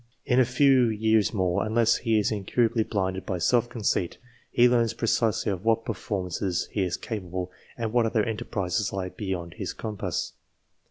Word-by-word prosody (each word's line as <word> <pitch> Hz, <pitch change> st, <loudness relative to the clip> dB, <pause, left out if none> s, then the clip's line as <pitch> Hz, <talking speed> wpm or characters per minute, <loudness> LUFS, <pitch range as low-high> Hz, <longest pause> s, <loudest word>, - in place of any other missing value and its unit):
In 130 Hz, -2 st, +3 dB
a 130 Hz, -, +5 dB
few 130 Hz, 0 st, +4 dB
years 110 Hz, -1 st, +2 dB
more, 90 Hz, -4 st, 0 dB
unless 115 Hz, +1 st, +2 dB
he 115 Hz, -2 st, +1 dB
is 105 Hz, -, +1 dB
incurably 115 Hz, +3 st, +1 dB
blinded 95 Hz, -3 st, -2 dB
by 95 Hz, -, -3 dB
self 120 Hz, +6 st, +2 dB
conceit, 105 Hz, -7 st, -1 dB, 0.3 s
he 120 Hz, -, +5 dB
learns 120 Hz, -2 st, +2 dB
precisely 110 Hz, -2 st, +1 dB
of 95 Hz, -1 st, -4 dB
what 115 Hz, 0 st, +2 dB
performances 95 Hz, -3 st, -2 dB
he 105 Hz, -, -1 dB
is 90 Hz, -2 st, -1 dB
capable, 95 Hz, -5 st, -5 dB, 0.3 s
and 115 Hz, -2 st, -3 dB
what 120 Hz, -2 st, +3 dB
other 110 Hz, -1 st, +1 dB
enterprises 105 Hz, -3 st, -2 dB
lie 95 Hz, -1 st, -3 dB
beyond 90 Hz, -4 st, -5 dB
his 95 Hz, -, -3 dB
compass. 105 Hz, -3 st, -4 dB
110 Hz, 165 wpm, -26 LUFS, 95-115 Hz, 0.3 s, a